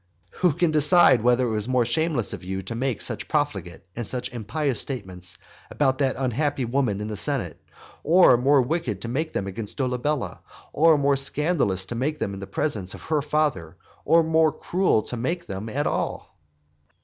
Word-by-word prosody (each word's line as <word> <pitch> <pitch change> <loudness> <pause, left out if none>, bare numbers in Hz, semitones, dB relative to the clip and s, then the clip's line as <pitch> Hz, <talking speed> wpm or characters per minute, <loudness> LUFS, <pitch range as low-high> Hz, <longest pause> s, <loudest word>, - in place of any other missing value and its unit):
Who 180 -4 +3
can 170 +2 +1
decide 155 -4 +5
whether 125 +2 +3
it - - -2
was 105 0 -2
more 125 -2 +2
shameless 145 - -1
of - - -7
you 95 +1 -4
to 95 - -6
make 125 +1 -2
such - - -4
profligate 100 - -2
and 120 -3 -3
such 125 -1 -1
impious 125 +4 -2
statements 95 -9 -5 0.3
against 135 -2 0
that 135 -2 +1
unhappy 135 +1 -1
woman 120 -5 0
in 105 - -4
the 110 - -4
senate, 100 - -2 0.4
or 175 -3 +6
more 135 +2 +4
wicked 125 - -2
to - - -4
make 155 +7 -2
them 100 - -2
against 100 +2 -6
Dolabella, 130 +1 -2 0.3
or 160 0 +5
more 140 -1 +2
scandalous 135 - +1
to 120 - -6
make 140 +6 -2
them 100 - -3
in 95 - -7
the 100 - -7
presence 100 -4 -2
of - - -12
her 155 -2 0
father, 145 - -1 0.3
or 165 0 +4
more 160 0 +3
cruel 180 - +1
to 125 - -5
make 165 +9 -2
them 100 +3 -6
at 145 +6 -2
all? - - -3
130 Hz, 185 wpm, -24 LUFS, 110-150 Hz, 0.4 s, or